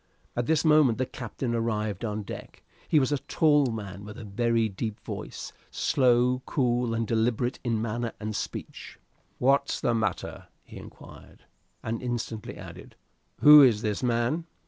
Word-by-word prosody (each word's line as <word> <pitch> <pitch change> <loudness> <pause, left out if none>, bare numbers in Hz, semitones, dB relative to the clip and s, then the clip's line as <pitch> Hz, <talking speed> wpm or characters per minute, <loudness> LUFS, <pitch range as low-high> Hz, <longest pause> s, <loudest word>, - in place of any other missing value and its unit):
At 120 0 -1
this 160 0 +2
moment 150 -7 +5
the 130 - 0
captain 120 0 -5
arrived 110 -3 -2
on 105 -2 -3
deck. - - -9 0.2
He 155 - +4
was 130 0 0
a 145 - +1
tall 145 -2 +3
man, 100 -4 -6
with 105 +1 -9
a 120 - -8
very 115 +2 +1
deep 105 +1 -5
voice, - - -7 0.2
slow, 125 -1 +2
cool, 120 -4 0
and 115 0 -1
deliberate 115 +3 0
in 115 -3 0
manner 115 +1 -3
and 110 0 -4
speech. - - -6 0.4
"What's 140 +2 +2
the 120 - +1
matter?" 110 -5 -3 0.2
he - - -12
inquired, - - -14 0.4
and 115 +1 -3
instantly 120 -3 -4
added, - - -11 0.5
"Who 150 0 +10
is 120 -5 +4
this 105 -2 -1
man?" 125 +7 0
120 Hz, 155 wpm, -27 LUFS, 110-130 Hz, 0.5 s, Who